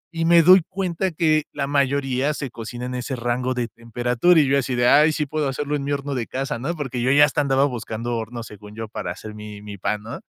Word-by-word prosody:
y 165 - 0
me 170 0 +6
doy 185 +2 +8
cuenta 185 -1 -2
que 155 -2 +2
la 140 -1 -2
mayoría 140 0 0
se 140 -5 -5
cocinan 120 +2 -6
a 125 - -3
ese 130 +2 -4
rango 125 +2 -1
de 120 -1 -1
temperatura, 120 +9 +1
y 150 - +4
yo 140 +1 +3
así 130 -1 -2
de, 120 0 +2
ay, 150 +4 +6
sí 150 -1 -1
puedo 150 0 -2
hacerlo 145 +2 -2
en 145 - -3
mi 140 - -3
horno 140 0 -2
de 125 -4 -3
casa, 130 -3 -3
¿no? 165 +7 -3
Porque, 135 -6 -4
yo 130 +2 +2
ya 145 +1 +7
hasta 150 0 0
andaba 135 0 +2
buscando 120 -2 -4
horno, 115 +1 -5
según 105 -1 -12
yo, 110 0 -5
para 105 -4 -5
hacer 105 +4 -8
mi 105 -1 -9
mi 100 -2 -9
pan, 105 +3 -2
¿no? 115 - -7
130 Hz, 250 wpm, -22 LUFS, 115-145 Hz, -, doy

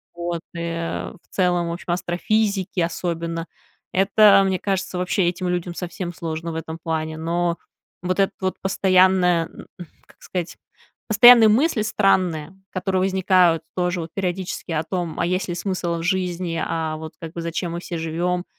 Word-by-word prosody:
вот, 170 -1 -3
э, 170 0 -3
в - - -15 0.2
целом, 175 -2 +1
в 170 - -2
общем, 175 0 -5
астрофизики 190 +2 0
особенно, 165 0 -2 0.5
это, 195 +1 +6
мне 190 -1 0
кажется, 190 -1 -2
вообще 180 0 +1
этим 180 0 -3
людям 175 0 -2
совсем 175 0 -5
сложно 165 0 -4
в - - -6
этом 160 0 -5
плане. 160 -1 -2
Но 170 +1 -1 0.5
вот 185 +2 -1
этот 195 - +2
вот 185 0 -1
постоянные, 185 -2 +3
м, - - -13 0.4
как - - -22
сказать, 180 -2 -5 0.5
постоянные 225 +1 +8
мысли 240 +1 +3
странные, 190 -6 +1 0.2
которые 185 0 -1
возникают 185 -3 +3
тоже 180 0 0
вот 165 0 -6
периодически 185 -2 -3
о 155 -1 0
том, 175 -1 -3
а 170 - +2
есть 185 +1 -1
ли 175 - -2
смысл 175 -2 -2
в - - -5
жизни, 180 -2 -1
а 160 -1 -2
вот 155 0 -8
как 165 -1 -7
бы 170 - -5
зачем 170 +1 -3
мы 170 - -4
все 170 -2 -5
живем, 175 +2 -1
180 Hz, 165 wpm, -22 LUFS, 170-190 Hz, 0.5 s, постоянные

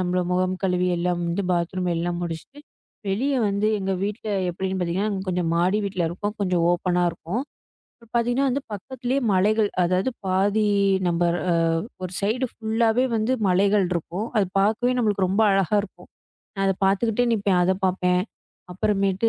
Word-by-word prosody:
நம்ம 180 0 0
முகம் 185 +1 +1
கழுவி 180 -1 +1
எல்லாம் 175 0 -1
வந்து 175 +4 -1
பாத்ரூம் 180 +1 -1
எல்லாம் 175 +1 -2
முடிச்சுட்டு 170 - -6 0.5
வெளிய 260 +9 0
வந்து 200 +1 0
எங்க 195 0 -2
வீட்ல 210 +2 -3 0.2
எப்படின்னு 190 +2 -3
பார்த்தீங்கன்னா 190 +3 -1
கொஞ்சம் 180 -2 0
மாடி 180 +5 +2
வீட்டில 185 -3 -1
இருக்கோம். 205 +5 -4
கொஞ்சம் 180 -3 +1
ஓபனா 180 0 +1
இருக்கும். 170 +7 -4 0.8
பார்த்தீங்கன்னா 245 +3 +2
வந்து 270 +2 -1
பக்கத்துலயே 255 +5 -3
மலைகள். 210 +3 +3
அதாவது 185 +7 +1 0.2
பாதி 200 +3 +2 0.4
நம்ம 170 0 0 0.8
ஒரு 180 - -5
சைடு 225 +6 0
ஃபுல்லாவே 225 +2 +1
வந்து 220 +3 0 0.2
மலைகள் 195 +2 +3
இருக்கும். 175 +5 -3
அது 200 - +3
பார்க்கவே 225 +5 +2
நம்மளுக்கு 205 -5 +1
ரொம்ப 200 +4 +2
அழகா 195 +1 +2
இருக்கும். 200 - -12 0.5
நான் 195 - -1
அதப் 195 +1 -1
பார்த்துக்கிட்டே 225 +5 +2
நிப்பேன். 200 -4 +2
அதைப் 190 +2 0
பார்ப்பேன். 180 -1 +2 0.5
அப்புறமேட்டு 195 +2 +1
195 Hz, 145 wpm, -24 LUFS, 180-215 Hz, 0.8 s, மலைகள்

